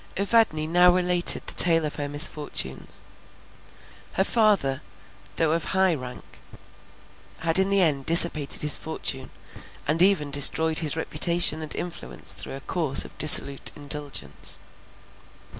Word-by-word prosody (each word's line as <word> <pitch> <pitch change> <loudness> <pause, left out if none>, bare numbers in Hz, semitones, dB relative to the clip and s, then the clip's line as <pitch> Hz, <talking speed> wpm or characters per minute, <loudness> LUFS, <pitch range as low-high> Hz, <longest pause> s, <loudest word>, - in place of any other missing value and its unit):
Evadne 200 -6 0
now 175 +3 +2
related 180 -1 +3
the - - -7
tale 165 -2 +2
of 150 - -7
her 145 -1 -6
misfortunes. 145 - -1 1.1
Her 190 - -1
father, 200 - -1 0.5
though 160 -2 -1
of 165 -1 -3
high 190 -1 0
rank, 130 -4 -11 1.0
had 165 +2 +4
in 190 +1 +1
the 200 -1 +4
end 145 -6 -1
dissipated 165 -4 +4
his 150 - +5
fortune, 135 -4 -6 0.6
and 155 +3 0
even 180 -7 +1
destroyed 160 +3 +3
his 160 -1 -4
reputation 170 -1 0
and 155 - -6
influence 65 - -8
through - - -9
a 135 - -11
course 155 -5 0
of - - -15
dissolute 140 -2 +4
indulgence. 145 -1 -5
160 Hz, 130 wpm, -22 LUFS, 145-175 Hz, 1.1 s, his